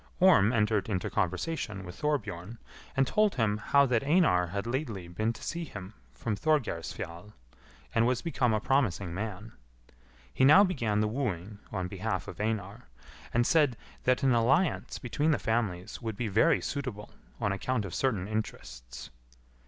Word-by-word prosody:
Orm 165 - +6
entered 105 -3 +1
into 95 -4 -2
conversation 100 - -2
with 90 - -8
Thorbjorn, 110 - -3 0.4
and 135 - +4
told 210 +8 +2
him 110 -4 +1
how 140 +6 +4
that 125 -2 +1
Einar 145 - +3
had 100 +4 -4
lately 115 - -3
been 110 +6 -1
to 115 - -10
see 170 +1 -3
him 100 - -8 0.2
from 105 - -3
Thorgeirsfjall, 105 - -2 0.6
and 115 +1 +3
was 125 -1 0
become 135 -8 +1
a 110 - +2
promising 105 -9 0
man. 105 +2 -5 0.8
He - - +1
now 155 +9 +8
began 115 - 0
the 110 - +2
wooing 105 -5 -3
on 90 -1 -2
behalf 95 -1 -3
of - - -7
Einar, 110 +1 -3 0.4
and 120 0 +2
said 145 -6 +3 0.3
that 125 +1 +2
an 130 -2 +4
alliance 135 +9 +2
between 145 +5 -1
the 150 - +3
families 105 -6 -2
would 110 -3 -4
be 120 - -1
very 115 - +3
suitable 125 -8 -5 0.3
on 105 -4 0
account 110 +3 -1
of 95 - -7
certain 105 -9 0
interests. - - -6
110 Hz, 160 wpm, -29 LUFS, 100-135 Hz, 0.8 s, now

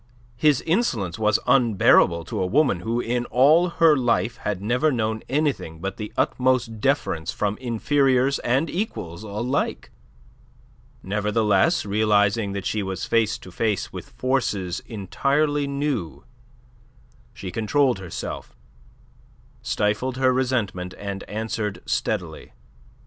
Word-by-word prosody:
His 145 +2 +3
insolence 120 - 0
was 105 0 +3
unbearable 105 -8 +4
to - - -3
a - - +1
woman 135 - +2
who 115 +6 -2
in 120 0 -1
all 150 +10 +4
her 165 -2 +4
life 120 -2 0
had 105 -3 -3
never 125 +9 +1
known 110 -3 -1
anything 135 - -1
but 95 +3 -4
the 105 - -6
utmost 125 -3 +1
deference 105 - 0
from 105 -1 -1
inferiors 130 +2 +1
and 130 +7 +1
equals 105 - -4
alike. 110 +6 -2 1.1
Nevertheless, 105 - +1
realizing 105 0 +2
that 100 -1 -5
she 110 - -1
was 95 -2 -4
face 115 -2 +1
to 90 - -13
face 105 +1 -1
with - - -8
forces 105 -9 -1
entirely 140 +8 0
new, 140 - -3 1.1
she 95 - -7
controlled 120 +3 +1
herself, 90 -7 -7 1.1
stifled 115 +5 -1
her 130 -1 +3
resentment, 115 -9 -1
and 100 -1 -5
answered 110 -1 -3
steadily. - - -3
115 Hz, 120 wpm, -23 LUFS, 100-130 Hz, 1.1 s, unbearable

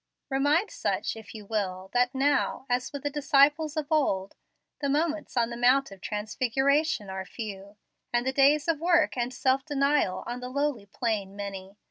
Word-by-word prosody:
Remind 290 +9 +2
such, - - -2
if 225 0 -11
you 210 -2 -9
will, 190 -3 -3
that 245 +1 +2
now, 275 0 +1
as 250 +1 0
with 285 -2 -6
the 290 - -1
disciples 295 +2 +3
of 305 - 0
old, 200 -11 +1 0.4
the 280 - -1
moments 305 -1 -1
on 235 0 +2
the - - -4
Mount 250 +1 +3
of 195 -1 -12
Transfiguration 255 +5 0
are 190 0 -4
few, 200 -1 -8 0.3
and 240 0 +1
the 265 - 0
days 285 +3 +4
of 330 -3 +1
work 335 -1 +3
and 245 0 -1
self 260 +1 +1
denial 280 -7 +1
on 240 +1 -4
the 250 0 -6
lowly 280 -6 -1
plain 205 -4 -2
many. 200 -1 -7
255 Hz, 175 wpm, -28 LUFS, 210-290 Hz, 0.4 s, days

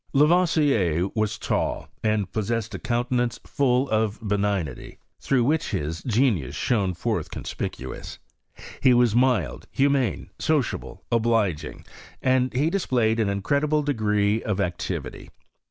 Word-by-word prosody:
l^voisier 145 - +3
was 110 -1 0
tall, - - -2 0.2
and 105 -3 0
possessed 110 +2 -2
a - - -4
countenance 120 0 -1
full 135 -1 +1
of 110 -1 +1
l>eni^nity, 100 - -2 0.2
through 130 -3 +1
which 155 +6 +1
his 80 +2 -3
genius 105 - +1
shone 100 -7 0
forth 85 - -2
conspicuous. 65 - -6 0.6
He 130 -2 +5
was 120 -3 +4
mild, 125 -1 +1
humane, 140 -3 +1
sociable^ 150 -7 -1
obli(^ingy 110 -10 0 0.3
and 130 0 +2
hc 145 +6 +1
displayed 120 - +1
an 105 -3 +2
incredible 140 +10 +1
degree 105 -5 +1
of 105 -2 -2
activity. 90 -3 -3
115 Hz, 120 wpm, -25 LUFS, 100-130 Hz, 0.6 s, He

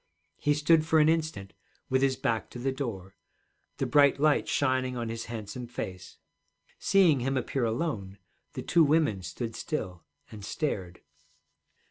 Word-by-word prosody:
He 145 0 +2
stood 155 +2 +4
for 160 0 +2
an 155 0 +5
instant 155 -12 -1 0.3
with 130 0 +1
his 135 -1 +2
back 115 -3 -1
to - - -9
the 130 +2 -1
door, 110 -9 -5 0.6
the - - -1
bright 140 -1 +4
light 150 0 +3
shining 130 -2 0
on 115 -1 -3
his 115 0 -5
handsome 115 +1 -6
face. 95 -6 -7 0.6
Seeing 180 -8 +4
him 135 +2 -1
appear 130 0 -1
alone, 110 - -3 0.4
the 130 -4 -5
two 170 - +4
women 145 - +2
stood 115 +6 -5
still 95 - -4 0.3
and 105 -2 -9
stared. 95 - -3
130 Hz, 150 wpm, -28 LUFS, 110-150 Hz, 0.6 s, an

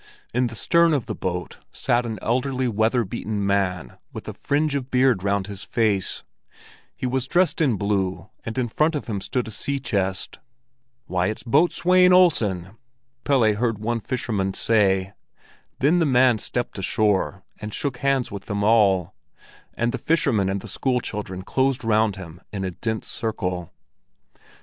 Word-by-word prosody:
In 125 +1 +2
the 115 - -8
stern 170 +7 +3
of 135 - -1
the - - -4
boat 90 -1 -4
sat 120 0 0
an 110 -2 -4
elderly, 130 +2 0
weather 115 +2 +2
beaten 105 0 -3
man 90 -8 -1
with - - -8
a - - -4
fringe 145 +1 0
of 135 -2 -3
beard 125 -6 +3
round 100 0 0
his 100 0 -6
face; 105 -5 0 0.7
he - - -5
was 130 +1 -1
dressed 180 +1 +2
in 135 -8 +3
blue, 95 -2 -1 0.2
and 115 +2 -6
in 125 -2 +1
front 155 +7 +1
of 145 - -3
him 100 -4 -3
stood 125 +4 -2
a - - -6
sea 140 +6 -2
chest. 100 -8 -2 0.7
"Why, 90 0 0
it's 110 - -4
Boatswain 180 +7 +4
Olsen!" 105 - +3 0.5
Pelle 120 -7 +4
heard 115 +1 0
one 115 +3 -2
fisherman 105 -6 -2
say. 95 -3 +2 0.6
Then 155 +7 +3
the 165 - +2
man 125 -3 +4
stepped 120 -3 -3
ashore, 100 -1 0 0.2
and 105 0 -6
shook 135 +3 -3
hands 135 -1 0
with 100 -1 -7
them 100 -1 -2
all; 100 -5 +3 0.6
and 120 +1 0
the - - -4
fisherman 130 - +1
and 95 0 -2
the - - -9
school 130 -2 0
children 95 -5 -5
closed 130 +4 0
round 110 -2 +2
him 90 -2 -10
in 100 -2 -4
a 95 - -2
dense 110 +5 -4
circle. 90 -7 -3
110 Hz, 165 wpm, -23 LUFS, 100-130 Hz, 0.7 s, Boatswain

